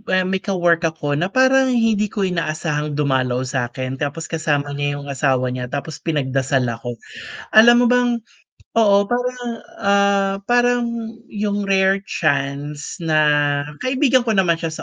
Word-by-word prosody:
ah, 185 - +3
may 190 +1 -1
ka-work 175 -4 +1
ako 150 -3 -3
na 175 - 0
parang 260 +3 +3
hindi 220 -3 +2
ko 200 0 -3
inaasahang 155 -4 -2
dumalaw 130 -3 0
sakin 130 0 -4
tapos 145 +3 -4
kasama 145 -3 -1
niya 145 0 -2
yung 145 0 -7
asawa 130 -2 0
niya 125 0 -4
tapos 145 +3 -6
pinagdasal 135 -4 -1
ako, 120 +1 -6 0.6
alam 240 +2 +7
mo 245 - +3
bang 245 -1 +2 0.6
oo 200 -3 +5
parang, 250 +1 -2 0.4
ah, 200 -1 +2
parang 245 0 +2 0.5
yung 205 -1 -2
rare 195 0 +3
chance 145 0 -2
na 160 -2 +1 0.6
kaibigan 260 0 +2
ko 225 -4 -1
naman 180 -3 +3
siya 165 0 -4
170 Hz, 140 wpm, -20 LUFS, 145-210 Hz, 0.6 s, alam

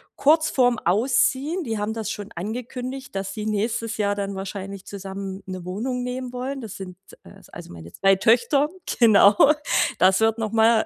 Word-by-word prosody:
kurz 315 +2 +3
vorm 245 -3 +3
Ausziehen, 260 - +1
die 225 -6 -3
haben 210 +1 -2
das 225 -2 -4
schon 205 0 -7
angekündigt, 250 +6 -6
dass 195 0 -3
sie 215 -1 -5
nächstes 220 +1 -2
Jahr 205 -1 +1
dann 200 -1 -4
wahrscheinlich 195 0 -7
zusammen 195 0 -7
'ne 185 -2 -7
Wohnung 245 +7 -3
nehmen 250 0 -4
wollen. 265 +2 -4
Das 220 -4 -8
sind, 185 -2 -9 0.3
äh - - -15
s - - -19
also - - -11
meine 85 0 -11
2 195 0 +3
Töchter, 240 +8 +3 0.3
genau. 210 -3 +6 0.6
Das 185 +1 +4
wird 225 0 +2
noch 220 -2 -3
mal 225 0 +4
220 Hz, 175 wpm, -23 LUFS, 195-250 Hz, 0.6 s, genau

